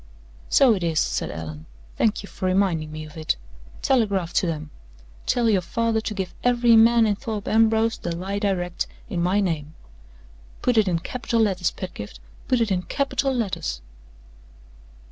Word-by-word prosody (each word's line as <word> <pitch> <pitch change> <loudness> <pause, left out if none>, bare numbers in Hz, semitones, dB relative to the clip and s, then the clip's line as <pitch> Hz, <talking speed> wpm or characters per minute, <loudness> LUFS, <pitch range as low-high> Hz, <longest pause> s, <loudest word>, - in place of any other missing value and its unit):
"So 265 -4 +6
it 195 - -2
is," 165 -2 +1
said - - -1
Allan. 80 -1 -7 0.3
"Thank 215 -2 +1
you - - -8
for 185 - -4
reminding 185 -5 +1
me 155 0 -6
of 155 - -13
it. 155 -1 -1 0.5
Telegraph 200 -9 +1
to 180 - +2
them! 155 -2 -4 0.6
Tell 240 -2 +2
your 205 -4 +3
father 230 +4 0
to 220 - -3
give 190 -3 -3
every 240 -1 +4
man 230 +1 +6
in 210 - +2
Thorpe 215 -2 -5
Ambrose 225 0 +3
the 170 -1 -3
lie 195 +4 -3
direct, 180 -4 -1 0.2
in 175 - -2
my 185 +4 +2
name. 160 -4 -2 0.9
Put 245 -2 +2
it 210 - +2
in 175 -2 +2
capital 230 +6 -2
letters, 190 -5 +2
Pedgift 105 - -8 0.3
put 250 -2 +2
it 225 -3 +1
in 180 -1 +1
capital 275 +5 -1
letters!" 190 - -2
195 Hz, 165 wpm, -24 LUFS, 170-225 Hz, 0.9 s, So